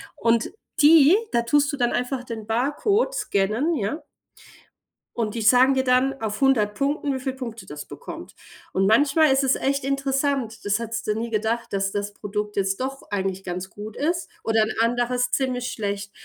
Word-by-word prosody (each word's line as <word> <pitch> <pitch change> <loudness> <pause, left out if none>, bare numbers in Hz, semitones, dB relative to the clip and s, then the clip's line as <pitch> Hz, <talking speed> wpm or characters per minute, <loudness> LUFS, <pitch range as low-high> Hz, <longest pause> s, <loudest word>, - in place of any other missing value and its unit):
Und 230 0 +1 0.3
die 305 +2 +7 0.2
da 235 - +2
tust 290 +5 +2
du - - -3
dann 240 -2 +1
einfach 250 +1 -2
den 225 -3 -7
Barcode 295 - +1
scannen, 220 - 0
ja? 285 +6 -3 1.1
Und 220 -2 -2
die 230 - -2
sagen 255 +4 +5
dir 265 - +2
dann 260 +1 +2
auf 215 +1 -3
100 230 -7 +3
Punkten, 280 +4 -1
wie 260 - -3
viele 260 0 -4
Punkte 230 -4 -7
das 150 0 -8
bekommt. - - -9 0.4
Und 195 +1 +1
manchmal 285 +8 +4
ist 270 +1 +3
es 265 -1 +3
echt 275 0 -1
interessant, 275 -3 -1
das 205 +2 +1
hättest 230 0 -4
du 210 - +2
nie 225 +2 -3
gedacht, 225 +2 -1
dass 195 0 -1
das 205 0 -3
Produkt 210 0 -4
jetzt 195 +2 0
doch 270 +1 -4
eigentlich 190 -1 -2
ganz 180 +1 -5
gut 210 +2 -9
ist, 340 +4 -1 0.2
oder 225 -1 +3
'n 215 - -2
anderes 245 +2 +1
ziemlich 250 -2 -1
schlecht. 200 -2 -4
235 Hz, 180 wpm, -24 LUFS, 210-270 Hz, 1.1 s, die